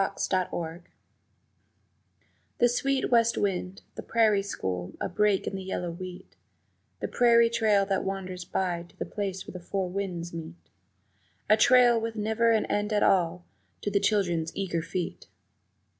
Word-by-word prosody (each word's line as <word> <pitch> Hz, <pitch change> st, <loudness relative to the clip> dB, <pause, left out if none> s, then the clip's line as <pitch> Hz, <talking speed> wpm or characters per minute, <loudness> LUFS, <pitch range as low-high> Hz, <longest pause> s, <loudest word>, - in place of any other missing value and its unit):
The 195 Hz, -, -1 dB
Prairie 185 Hz, -2 st, +1 dB
School 165 Hz, 0 st, -4 dB, 1.8 s
THE 240 Hz, -, +4 dB
sweet 270 Hz, +2 st, 0 dB
west 235 Hz, -1 st, +4 dB
wind, 190 Hz, -1 st, -2 dB
the -, -, -7 dB
prairie 215 Hz, -3 st, +3 dB
school 90 Hz, -, -4 dB
a -, -, -1 dB
break 205 Hz, +1 st, +1 dB
in -, -, -3 dB
the 190 Hz, -, -4 dB
yellow 180 Hz, -2 st, -3 dB
wheat, 180 Hz, +1 st, -9 dB, 0.7 s
The -, -, -1 dB
prairie 235 Hz, -1 st, +4 dB
trail 215 Hz, -4 st, +3 dB
that 195 Hz, -1 st, 0 dB
wanders 185 Hz, -2 st, -4 dB
by 175 Hz, -2 st, -1 dB
to -, -, -24 dB
the -, -, -3 dB
place 195 Hz, -2 st, -4 dB
where -, -, -9 dB
the 180 Hz, -, -6 dB
four 185 Hz, +1 st, -3 dB
winds 180 Hz, -3 st, -4 dB
meet 165 Hz, 0 st, -7 dB, 1.0 s
A -, -, +9 dB
trail 240 Hz, 0 st, +5 dB
with 225 Hz, 0 st, -3 dB
never 220 Hz, +2 st, +2 dB
an 220 Hz, -1 st, +2 dB
end 205 Hz, +1 st, -1 dB
at 210 Hz, -1 st, +2 dB
all 175 Hz, -2 st, +2 dB, 0.4 s
to 205 Hz, -, -2 dB
the 200 Hz, -, +3 dB
children's 175 Hz, -7 st, +1 dB
eager 180 Hz, -4 st, -1 dB
feet. 170 Hz, +1 st, -5 dB
195 Hz, 160 wpm, -28 LUFS, 180-220 Hz, 1.8 s, A